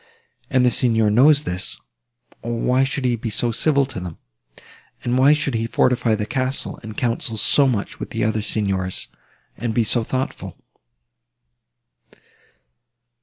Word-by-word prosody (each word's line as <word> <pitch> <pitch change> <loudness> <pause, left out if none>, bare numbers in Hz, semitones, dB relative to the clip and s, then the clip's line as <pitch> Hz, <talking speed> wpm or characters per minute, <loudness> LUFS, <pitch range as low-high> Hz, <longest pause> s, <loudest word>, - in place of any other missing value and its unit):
And 130 -4 +3
the 125 - +4
Signor 115 -4 +2
knows 140 +6 +5
this, 90 -10 -3 0.6
or 120 0 -3
why 125 +2 +2
should 135 0 -2
he 125 -1 +2
be 115 0 -5
so 115 +3 0
civil 140 +3 +2
to 130 -6 -7
them? 90 -2 -7 0.9
And 120 0 0
why 135 +3 +5
should 145 -3 -1
he 115 0 -1
fortify 120 -1 +2
the 105 -1 -3
castle, 130 +2 -3
and 110 -1 -9
counsel 115 -2 -2
so 140 +6 +4
much 110 -6 -2
with - - -6
the 115 -1 -2
other 110 0 0
Signors, 95 -4 -2 0.5
and 115 -2 -3
be 120 - +3
so 115 +2 +3
thoughtful?" 130 +3 -4
120 Hz, 150 wpm, -21 LUFS, 110-130 Hz, 0.9 s, knows